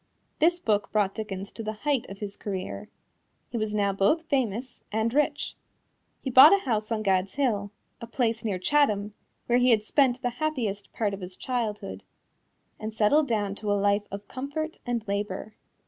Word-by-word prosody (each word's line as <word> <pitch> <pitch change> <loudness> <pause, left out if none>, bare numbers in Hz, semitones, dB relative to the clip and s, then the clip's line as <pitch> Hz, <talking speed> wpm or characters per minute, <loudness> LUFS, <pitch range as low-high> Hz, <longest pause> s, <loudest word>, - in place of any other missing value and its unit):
This 345 +3 +4
book 210 -8 0
brought 205 -2 +2
Dickens 200 -3 -5
to - - -8
the 215 0 -3
height 285 -5 +1
of 195 - -8
his 200 -1 -5
career. 185 - -5 0.6
He 235 - -2
was 215 -1 -1
now 200 -2 +1
both 200 - +2
famous 255 -5 -2
and 220 +2 0
rich. 295 +2 0 0.7
He 265 - -2
bought 280 +9 +10
a 395 - -4
house 220 -3 -1
on 215 -1 0
Gad's 190 -1 +1
Hill 220 -8 0 0.3
a 230 - -6
place 230 -1 0
near 205 -4 -1
Chatham, 210 -3 +2 0.3
where 245 +1 +3
he 250 +1 +4
had 220 -3 +4
spent 255 +1 +2
the 245 - +1
happiest 230 -10 -2
part 210 -3 -1
of 195 - -6
his 180 0 -8
childhood 210 - -3 0.8
and 215 0 -5
settled 280 +8 +4
down 205 -4 0
to 205 +1 -3
a 205 - +3
life 200 +1 +2
of 200 +1 -7
comfort 285 +5 -4
and 235 -2 -2
labor. 200 +1 -3
215 Hz, 180 wpm, -27 LUFS, 200-255 Hz, 0.8 s, bought